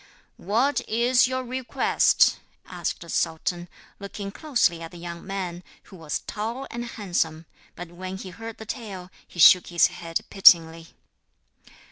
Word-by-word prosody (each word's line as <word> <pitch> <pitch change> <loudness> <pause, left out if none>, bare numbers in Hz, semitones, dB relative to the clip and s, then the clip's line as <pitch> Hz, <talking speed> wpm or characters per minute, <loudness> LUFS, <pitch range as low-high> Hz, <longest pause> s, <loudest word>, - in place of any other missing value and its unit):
'What 235 +10 0
is 245 +3 +3
your 260 0 -3
request?' 255 0 +2 0.3
asked - - -5
the - - -10
sultan, 175 +2 -2 0.3
looking 200 0 -7
closely 240 - 0
at 165 - -7
the 175 - -13
young 170 0 -8
man, 185 -3 -5 0.2
who 195 - -15
was 160 -4 -5
tall 230 +6 -4
and 240 0 -5
handsome; 175 -8 -3 0.3
but 175 -1 -8
when 185 +2 -7
he 190 -1 -9
heard 225 +2 -9
the 220 - -10
tale 195 -6 -7 0.2
he 175 - -12
shook 180 +3 +7
his 175 -1 +4
head 165 -1 -4
pityingly. 165 -4 +5
190 Hz, 145 wpm, -25 LUFS, 170-230 Hz, 0.3 s, shook